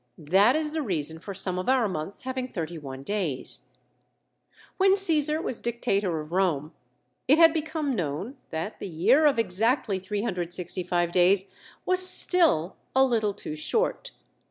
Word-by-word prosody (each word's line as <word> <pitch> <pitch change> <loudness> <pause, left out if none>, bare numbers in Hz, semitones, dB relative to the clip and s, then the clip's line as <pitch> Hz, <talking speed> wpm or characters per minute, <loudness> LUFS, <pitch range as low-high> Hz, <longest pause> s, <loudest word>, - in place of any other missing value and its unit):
That 190 - +3
is 310 -1 -1
the 315 0 -2
reason 160 - -3
for 195 +3 -8
some 185 -1 -2
of 185 - -3
our 255 -4 +3
months 180 +1 -5
having 260 0 -3
thirty 170 -6 -5
one 135 -2 -8
days. 180 -8 -3 1.2
When 385 0 +4
Caesar 315 -5 +5
was 255 - -4
Dictator 205 -7 -1
of 150 +1 -11
Rome, 170 -5 0 0.5
it 290 - +5
had 330 -1 +7
become 310 -2 -2
known 190 - -3
that 160 +7 -5
the - - -6
year 225 - +3
of 285 - +2
exactly 220 0 0
365 180 -3 -2
days 185 +2 +3 0.4
was 370 0 +2
still 330 - +2 0.2
a 265 - +6
little 220 -5 0
too 155 - -7
short. 450 - -1
200 Hz, 150 wpm, -26 LUFS, 175-270 Hz, 1.2 s, had